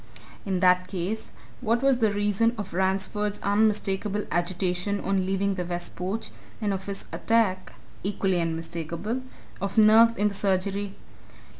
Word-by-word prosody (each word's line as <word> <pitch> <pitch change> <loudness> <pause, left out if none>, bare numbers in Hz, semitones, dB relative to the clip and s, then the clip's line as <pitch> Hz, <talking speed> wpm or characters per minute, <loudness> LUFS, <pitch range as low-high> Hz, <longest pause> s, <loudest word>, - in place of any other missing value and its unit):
In 185 -2 0
that 180 0 +4
case, 195 +4 -4 0.3
what 235 0 0
was 270 -2 +4
the 220 -3 +3
reason 205 +3 +1
of 205 -5 -5
Ransford's 195 +3 0
unmistakable 205 -1 +1
agitation 180 +3 0
on 190 -1 0
leaving 195 +1 +1
the 185 -2 -2
west 175 0 -5
porch, 190 +5 -3 0.3
and 205 -2 0
of 190 0 -5
his 200 -1 -5
attack 215 -5 +1 0.3
equally 190 -2 0
unmistakable 165 +7 -3 0.4
of 200 +3 -3
nerves 225 +2 +7
in 210 -1 +2
the - - -7
surgery? 195 0 -1
195 Hz, 140 wpm, -26 LUFS, 185-210 Hz, 0.4 s, nerves